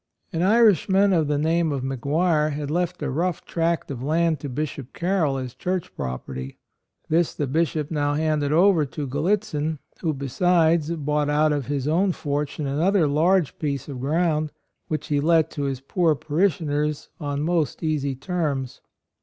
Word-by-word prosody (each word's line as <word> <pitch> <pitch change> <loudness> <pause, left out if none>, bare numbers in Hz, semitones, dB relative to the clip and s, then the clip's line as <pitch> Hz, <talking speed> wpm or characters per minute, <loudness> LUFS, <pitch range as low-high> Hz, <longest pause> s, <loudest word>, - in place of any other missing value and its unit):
An 165 - -1
Irishman 200 -1 +4
of 160 -4 +2
the 145 0 +1
name 160 +2 +1
of 135 -3 -2
McGuire 150 +4 +1
had 145 0 -4
left 175 0 -1
a 145 - -1
rough 170 +4 -1
tract 165 -2 -1
of 125 -3 -5
land 160 +2 +1
to 145 - -5
Bishop 140 -1 -4
Carroll 170 -6 0
as 130 -2 -5
church 180 -1 -3
property; 65 +1 -5 0.5
this 165 +1 +2
the 145 - -1
Bishop 155 +1 -1
now 145 -2 0
handed 155 -2 0
over 175 0 +5
to 145 +1 -5
Gallitzin, 155 +1 -1 0.2
who, 160 -4 -1
besides, 160 +3 +2
bought 150 -1 0
out 150 +1 +3
of 140 -4 -2
his 140 -1 -2
own 180 +5 +2
fortune 145 0 -3
another 160 +5 +2
large 165 +3 +2
piece 140 -4 -2
of 135 -4 -6
ground, 155 +2 0 0.4
which 155 0 -3
he 145 -1 +2
let 160 +1 +3
to 145 - -3
his 135 -2 -3
poor 160 +3 +1
parishioners 150 -1 0
on 145 -2 -2
most 165 -3 0
easy 145 -4 0
terms. 140 -4 -3
155 Hz, 160 wpm, -24 LUFS, 145-170 Hz, 0.5 s, over